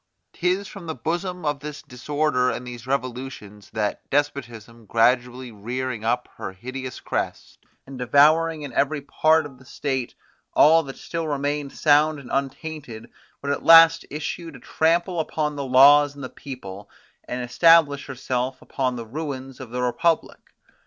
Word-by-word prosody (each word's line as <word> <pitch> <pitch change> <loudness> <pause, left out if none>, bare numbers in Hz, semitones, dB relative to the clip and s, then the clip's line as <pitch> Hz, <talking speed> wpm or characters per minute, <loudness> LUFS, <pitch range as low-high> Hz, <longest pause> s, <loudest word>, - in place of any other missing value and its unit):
'Tis 185 +3 -1
from 195 -5 -10
the 160 - -4
bosom 175 +6 -3
of 145 -1 -1
this 150 +1 -8
disorder 145 -1 0
and 125 - -4
these 120 0 -9
revolutions, 125 -6 -5
that 105 -1 -3
despotism 120 -6 -3
gradually 125 +2 +1
rearing 120 +2 -4
up 120 +2 0
her 95 - -6
hideous 130 +6 -7
crest, - - -4 0.3
and 135 -1 -10
devouring 155 +5 +3
in 140 -4 -7
every 145 +4 +1
part 155 +2 +2
of 135 -3 -11
the - - -16
state 130 -1 -4 0.4
all 165 +2 +6
that 135 -4 -9
still 165 -1 -4
remained 145 -1 -2
sound 150 0 +3
and 140 -3 -11
untainted, 135 -3 -4 0.3
would 140 - -1
at 145 - -2
last 165 0 +8
issue 155 +3 -5
to 145 - -11
trample 170 +2 0
upon 150 -1 -2
the 140 - -4
laws 145 +3 +6
and 140 - -9
the 130 - -5
people, 105 -7 -9 0.4
and 125 0 -4
establish 145 +2 +4
herself 130 -1 -3
upon 130 -2 -2
the 115 -1 -6
ruins 135 0 -6
of 130 -3 -9
the 125 +1 -3
republic. 165 +7 -1
140 Hz, 155 wpm, -23 LUFS, 125-155 Hz, 0.4 s, last